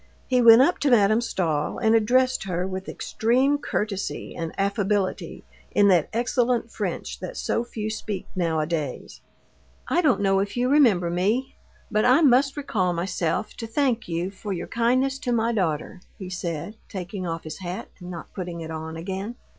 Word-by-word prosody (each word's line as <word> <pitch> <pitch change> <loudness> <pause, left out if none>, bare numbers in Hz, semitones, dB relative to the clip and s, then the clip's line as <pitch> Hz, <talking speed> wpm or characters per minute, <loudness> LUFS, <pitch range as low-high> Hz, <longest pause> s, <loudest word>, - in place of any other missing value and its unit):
He 250 -1 +3
went 235 +1 +9
up 345 - +1
to 290 - +2
Madame 215 -2 +4
Stahl, 160 -10 -1
and 220 -1 +2
addressed 255 +2 +3
her 180 -1 -2
with 190 0 -5
extreme 260 +6 +1
courtesy 210 -7 -3
and 165 -1 -4
affability 200 0 -1 0.3
in 205 0 +5
that 175 -5 +3
excellent 240 0 0
French - - -4
that - - -6
so 230 - 0
few 220 -3 -5
speak 210 -3 -4
nowadays. 160 -5 -2 0.7
"I 350 - +2
don't 285 -10 +3
know 195 -1 +3
if 200 +3 -2
you 250 +1 +1
remember 220 - +4
me, 210 +9 0 0.4
but 215 0 +2
I 255 +6 +5
must 275 0 +4
recall 190 -11 0
myself 175 +2 -2
to 230 - -5
thank 245 -1 0
you 175 +2 -2
for 200 +1 -5
your 175 - -4
kindness 255 +4 +1
to 250 -4 -2
my 235 0 +1
daughter," 180 -3 -2 0.2
he 185 -2 -7
said, 175 +3 -4
taking 185 -1 -5
off 165 0 -4
his 155 +2 -7
hat 180 0 -6
and 180 -1 -9
not 170 -2 -8
putting 175 -3 -5
it 160 0 -6
on 160 0 -6
again. 190 +6 -5
205 Hz, 170 wpm, -25 LUFS, 175-240 Hz, 0.7 s, went